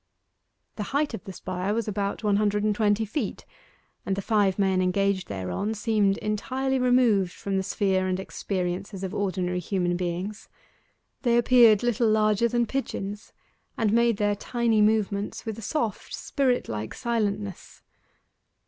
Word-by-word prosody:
The 215 +6 -2
height 295 -3 0
of 220 - -7
the 195 - -6
spire 185 +2 -3
was 230 -1 -1
about 200 +1 -2
one 205 -1 +3
hundred 210 0 +1
and 215 0 +2
twenty 210 +1 +1
feet, 220 0 -4 0.6
and 195 - -1
the 200 - -3
five 205 -4 +2
men 190 -2 +2
engaged 190 +1 +1
thereon 95 - -3
seemed 210 -2 +1
entirely 260 +5 -1
removed 245 -7 +3
from 200 -1 -4
the 190 - +2
sphere 190 -1 0
and 185 0 -1
experiences 190 0 -4
of 190 +1 -4
ordinary 185 -3 -1
human 180 -1 -1
beings. 180 +4 -4 0.7
They 240 -2 +3
appeared 235 -3 +6
little 235 -1 +2
larger 215 +1 +3
than 240 0 +1
pigeons, 210 -5 -4 0.5
and 220 -2 +1
made 235 -2 +3
their 205 0 +1
tiny 230 0 +1
movements 210 -1 0
with 220 -1 -4
a - - -8
soft, 225 -3 -3
spirit 255 -3 0
like 110 0 -5
silentness. 205 -5 -3
205 Hz, 150 wpm, -26 LUFS, 190-225 Hz, 0.7 s, appeared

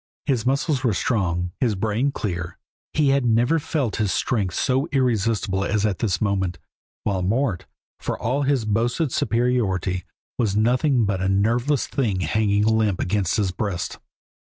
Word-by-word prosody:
His 125 -5 0
muscles 140 0 +1
were 115 -6 +2
strong, 90 -5 0
his 115 -5 +1
brain 110 +7 0
clear, 90 -7 -4 0.3
he 150 -3 +2
had 135 0 +3
never 120 +7 +3
felt 145 -6 -2
his 105 -4 0
strength 100 -8 0
so 135 +3 +1
irresistible 115 -7 +1
as 105 +1 0
at 100 -4 -1
this 105 -5 0
moment, 95 -4 0 0.5
while 100 -3 0
Mort, 105 +1 0 0.3
for - - -3
all 130 +5 -1
his 135 -5 +1
boasted 120 +7 0
superiority, 110 -8 0 0.4
was 105 -5 +1
nothing 125 +3 +2
but 100 -2 -1
a 95 - +1
nerveless 120 +8 +1
thing 105 -9 -1
hanging 100 +4 +1
limp 110 -3 +2
against 95 -1 0
his 100 -4 +1
breast. 95 -1 -3
110 Hz, 155 wpm, -23 LUFS, 95-125 Hz, 0.5 s, had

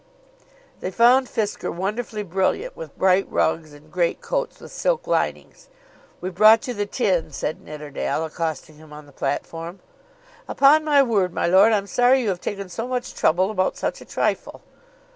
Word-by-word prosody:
They - - -4
found 245 +6 +4
Fisker 210 -3 -3
wonderfully 210 +4 -3
brilliant 195 - -1
with - - -10
bright 190 +1 +3
rugs, 160 -1 0
and 145 +1 -17
greatcoats 320 - -2
with - - -12
silk - - -1
linings. - - -2 0.5
"We've 185 +1 -4
brought 215 +5 +6
you 250 - -2
the 205 -2 -3
tin," 190 -8 0
said 155 - -4
Nidderdale, 150 +1 -4
accosting 160 -1 -5
him 155 0 -16
on 150 0 -11
the 145 - -18
platform. 165 +6 -4 0.7
"Upon 295 +3 +5
my 290 -2 +4
word, 200 -8 0
my - - 0
lord, 190 +6 +5
I'm 205 -2 +1
sorry 250 +5 +3
you 220 - 0
have 180 -2 -3
taken 200 -1 -4
so 205 +7 -5
much 255 0 -3
trouble 185 +5 +2
about 185 -3 -1
such - - -3
a - - -11
trifle." - - -2
195 Hz, 165 wpm, -22 LUFS, 165-245 Hz, 0.7 s, brought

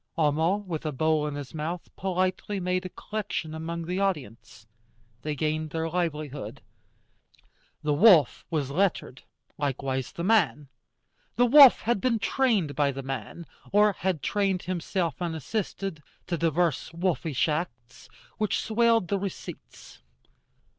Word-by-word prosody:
Homo, 160 +4 +2
with 185 -6 -5
a 155 - -2
bowl 155 +2 +1
in 145 - -4
his 145 -3 -7
mouth, 165 +3 -5
politely 185 +2 -1
made 180 0 -1
a - - -12
collection 205 -6 -4
among 165 +1 -4
the 180 +3 -2
audience. 115 - -3 0.6
They 150 +2 -3
gained 155 +1 -1
their 160 +1 -2
livelihood. 155 -5 -3 1.2
The 150 -1 +1
wolf 165 - +5
was 145 -4 -1
lettered, 170 -6 0 0.4
likewise 135 -2 -2
the 170 - -6
man. 185 -9 +2 0.7
The 245 - +4
wolf 275 +1 +8
had 230 -3 0
been 250 -3 +2
trained 220 - +1
by 145 -1 +2
the 135 0 -6
man, 135 +5 -6 0.3
or 210 0 +5
had 180 -4 -2
trained 195 -3 0
himself 175 -2 -2
unassisted, 175 +1 -3 0.2
to 175 - -2
divers 165 -1 0
wolfish 170 -5 0
arts, 130 -7 -5 0.3
which 215 -1 +1
swelled 230 -3 +2
the 200 +1 0
receipts. 195 -1 -8
170 Hz, 135 wpm, -27 LUFS, 150-195 Hz, 1.2 s, wolf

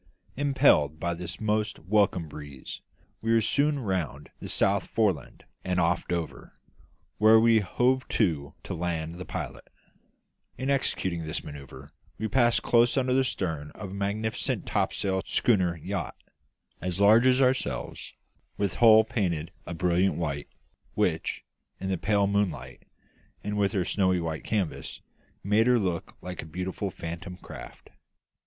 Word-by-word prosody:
Impelled 130 - +3
by 85 +1 -1
this 90 +1 -6
most 110 0 0
welcome 95 -2 +1
breeze, 75 -2 -9 0.4
we 115 - 0
were 115 - +5
soon 145 +7 +2
round 90 - -3
the - - -7
South 100 0 +2
Foreland 100 - -1 0.2
and 90 -1 0
off 85 0 +1
Dover, 85 -2 -4 0.6
where 110 +1 +7
we 115 0 +5
hove 125 +6 +1
to 80 -10 0
to - - -5
land 80 -1 -2
the 90 - -6
pilot. - - -6 0.9
In 135 +2 -1
executing 95 -10 0
this 80 -1 -4
manoeuvre 70 -3 -10 0.3
we 110 - -2
passed 120 0 +3
close 120 +2 +4
under 130 -1 +2
the 135 +1 +4
stern 80 - -3
of 100 -3 -7
a - - -7
magnificent 100 +3 -2
topsail 95 -1 0
schooner 90 -7 +2
yacht, 75 - -4 0.7
as 90 0 -2
large 110 +5 +6
as 130 0 +4
ourselves, 130 0 -1 0.4
with 100 -3 -1
hull 110 -2 +8
painted 90 -7 -2 0.2
a 85 - -4
brilliant 90 +3 +2
white, 70 -4 -3 0.5
which, - - 0 0.3
in 95 - -3
the 95 - 0
pale 100 -1 +2
moonlight 100 -1 -2 0.6
and 105 0 -3
with 100 -1 +1
her 95 -3 +1
snow 95 -2 +2
white 80 -2 -3
canvas, 100 -7 -2 0.4
made 105 +4 +3
her 125 -1 +5
look 90 -6 -2
like 90 -1 -6
a - - -9
beautiful 90 +4 -3
phantom 85 +1 -7
craft. - - -11
95 Hz, 145 wpm, -27 LUFS, 85-110 Hz, 0.9 s, hull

